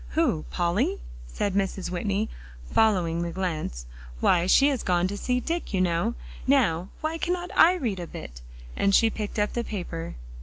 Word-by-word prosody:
"Who 305 - +2
Polly?" 175 -1 0 0.3
said 190 - -2
Mrs. 190 -2 -1
Whitney, 200 +4 -1 0.4
following 180 -7 +3
the 170 - -2
glance. 160 - -3 0.3
"Why, 175 - +3
she 275 +8 +6
has 270 -4 -1
gone 180 -1 +2
to 205 - -4
see 250 +4 0
Dick, 330 - -3
you - - +1
know. 185 +6 +1 0.3
Now, 195 -10 +3
why 320 +1 -2
cannot 355 +1 -2
I 350 +3 +7
read 230 - -2
a 175 - -5
bit?" - - -9 0.3
and 200 0 +3
she 225 -1 +5
picked 210 0 -5
up 210 0 +1
the 240 - -1
paper. 175 -6 -5
195 Hz, 175 wpm, -26 LUFS, 175-240 Hz, 0.4 s, I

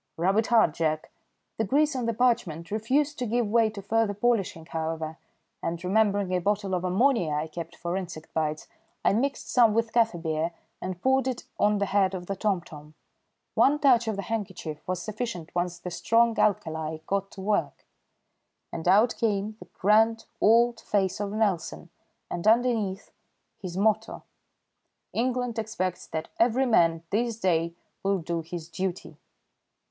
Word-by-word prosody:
"Rub 185 +4 +2
it 225 - 0
hard, 225 -9 +4
Jack." 155 -1 -1 0.5
The - - +3
grease 295 +6 +2
on 245 -3 -1
the 230 - +1
parchment 190 -9 0
refused 270 +8 0
to 250 - -1
give 235 +2 +1
way 225 +1 +3
to 205 -2 -8
further 220 0 +1
polishing, 205 -7 0
however, 160 -1 -4 0.4
and 170 +1 -3
remembering 200 0 +2
a 180 - +1
bottle 200 0 0
of 180 -1 0
ammonia 185 - +2
I 150 +1 -1
kept 165 +1 -7
for 175 +1 -3
insect 175 -4 -6
bites, 155 -1 -2 0.4
I - - +5
mixed 270 +6 -1
some 230 -4 +5
with 230 0 0
kaffir 225 -7 +2
beer 160 0 -1 0.3
and 185 -1 -4
poured 265 0 +3
it 255 -2 -3 0.2
on 210 0 +3
the 200 - +1
head 195 -1 +2
of 180 -1 -6
the 195 - -3
tomtom. 170 -7 -3 0.6
One 285 +2 +4
touch 250 -5 +4
of 220 - 0
the 200 - -4
handkerchief 190 -9 -4
was 180 -1 -2
sufficient 215 -6 -5
once 175 0 -1
the 180 +1 -7
strong 230 +6 +3
alkali 160 -6 0
got 195 +1 -1
to 195 - -9
work, 205 +2 -1 0.9
and 165 0 -4
out 215 +6 +5
came 210 -1 0
the 180 - -12
grand 225 +3 +3 0.2
old 235 +2 +4
face 195 -2 0
of 205 -1 -2
Nelson 200 -5 -1 0.4
and 175 +4 -3
underneath 220 -4 +2 0.5
his 185 -2 -6
motto: 215 +2 +1 0.9
"England 245 -1 -1
expects 185 -5 -3
that 160 -1 -4
every 245 +3 +3
man 165 -8 +3
this 230 +1 0
day 170 -4 +1 0.3
will 195 0 +1
do 170 -1 -3
his 165 0 -7
duty." 180 +2 -4
200 Hz, 165 wpm, -27 LUFS, 170-225 Hz, 0.9 s, I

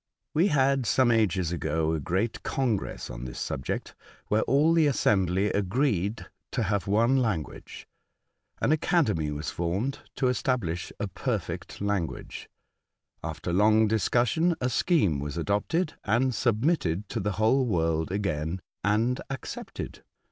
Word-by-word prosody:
" - - -58
We 170 +6 +4
had 135 - +2
some 130 +1 +4
ages 95 -7 +2
ago 80 -1 0
a 80 - -1
great 95 +8 -1
congress 120 -7 -1
on - - -7
this 65 - -7
subject, 65 - -3 0.4
where 105 +1 +3
all 145 +5 +4
the 165 -2 +4
assembly 100 -6 +2
agreed 105 0 0 0.3
to 120 - +1
have 100 -1 -1
one 115 +6 +3
language. 105 - -3 0.7
An - - +2
academy 150 - +2
was 75 0 -4
formed 95 +11 -2 0.2
to 130 - +1
establish 120 -9 -1
a - - -1
perfect - - -4
language. 100 -5 -3 0.7
After 85 +2 -4
long 110 +3 +5
discussion, 120 - +2
a 125 - 0
scheme 120 - +2
was 75 +3 -4
adopted 105 - 0
and 125 +5 +2
submitted 110 - +1
to 115 - -2
the 105 0 -1
whole 115 +7 +2
world 80 -4 0
again, 85 -3 -1 0.2
and 110 +6 +1
accepted. 135 -1 -6
105 Hz, 135 wpm, -27 LUFS, 85-130 Hz, 0.7 s, long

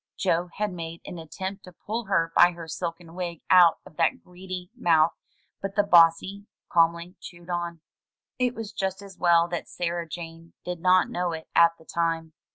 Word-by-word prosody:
Joe 175 -1 0
had 210 -2 -2
made 165 -1 -7
an 175 - -7
attempt 190 +5 -6
to 180 - -13
pull 225 +2 -3
her 165 -4 +1
by 175 0 +6
her 170 -1 -9
silken 165 0 -5
wig 175 -2 -5
out 175 -3 +7
of 155 - -16
that 165 -1 +1
greedy 180 0 -8
mouth, 165 -1 +3 0.5
but 195 0 -5
the 205 - +4
bossy 185 +3 +4 0.2
calmly 170 +2 +2
chewed 175 0 -10
on. 170 -1 -3 0.6
It 250 -1 +1
was 220 -2 -6
just 190 +1 -3
as 195 -2 -13
well 170 -1 +4
that 175 -1 -4
Sarah 170 -1 -3
Jane 165 0 -9
did 180 -1 -4
not 185 +1 +4
know 175 -1 -1
it 160 0 -8
at 170 0 +6
the 160 - -19
time. 165 -1 -2
175 Hz, 180 wpm, -26 LUFS, 165-185 Hz, 0.6 s, out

